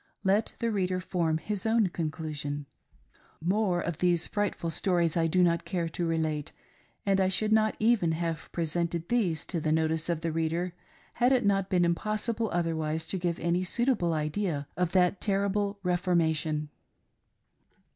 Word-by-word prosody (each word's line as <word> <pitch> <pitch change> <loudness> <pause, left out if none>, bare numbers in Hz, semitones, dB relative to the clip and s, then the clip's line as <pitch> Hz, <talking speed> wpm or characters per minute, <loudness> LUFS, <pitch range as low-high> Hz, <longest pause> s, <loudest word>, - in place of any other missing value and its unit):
Let 200 +3 +2
the 230 -1 -1
reader 185 -3 0
form 170 -3 0
his 205 +3 -3
own 225 -1 +3
conclusion. 150 -3 -4 0.7
More 185 +1 +1
of 170 -2 -3
these 175 -2 +2
frightful 205 -5 -2
stories 170 -1 +1
I 165 -1 +2
do 180 +3 +3
not 170 -1 +2
care 175 -4 -2
to 170 +1 -2
relate; 155 -3 -1 0.5
and 195 -1 +3
I 190 - +3
should 215 +3 +1
not 215 0 +3
even 215 -7 +3
have 165 -2 -3
presented 170 0 -2
these 195 -10 +1
to 175 - -2
the 155 0 -1
notice 160 +1 +1
of 165 -2 0
the 165 -1 -1
reader 165 +2 -1 0.4
had 245 +2 +3
it 255 -4 +3
not 195 -1 +2
been 180 -2 +3
impossible 215 +5 -1
otherwise 160 -2 -1
to 190 - -1
give 175 -1 -1
any 170 +2 +1
suitable 210 -4 +1
idea 155 -1 -2
of 175 0 0
that 180 0 +3
terrible 200 0 0
"Reformation." 160 -4 +1
175 Hz, 155 wpm, -29 LUFS, 160-200 Hz, 0.7 s, own